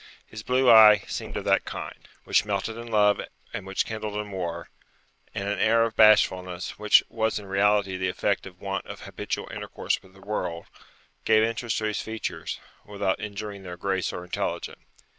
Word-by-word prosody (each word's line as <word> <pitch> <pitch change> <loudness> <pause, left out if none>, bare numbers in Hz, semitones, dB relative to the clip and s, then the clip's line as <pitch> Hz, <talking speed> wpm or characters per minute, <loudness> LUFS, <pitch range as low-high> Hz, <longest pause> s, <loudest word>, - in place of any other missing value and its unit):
His 110 - -9
blue 130 +3 +1
eye 110 -3 +9
seemed - - -5
of - - -3
that - - +3
kind, - - -8 0.2
Which - - +3
melted 105 +1 -2
in 120 +1 -8
love, 105 -2 +3 0.3
and 95 - -5
which 95 - -1
kindled 110 -1 -5
in 105 -1 -4
war; 85 -3 -4 0.7
and 100 - -3
an 105 - -1
air 115 +1 +4
of 115 -1 -2
bashfulness, 95 -5 +3
which 105 0 +5
was 110 -1 -1
in 105 - -7
reality 100 0 +2
the 95 0 -1
effect 100 +2 -1
of 90 -1 -14
want 95 -1 -4
of - - -8
habitual - - -5
intercourse - - -3
with 95 0 -20
the - - -16
world, 85 -5 -4 0.6
gave 110 0 +4
interest 115 0 -1
to 110 - -2
his 105 -1 -1
features, 110 -1 -5 0.2
without 100 -2 -2
injuring 105 -1 -6
their 90 -2 -8
grace 95 0 -1
or 90 - -6
intelligence. 90 - -4
105 Hz, 180 wpm, -26 LUFS, 95-110 Hz, 0.7 s, eye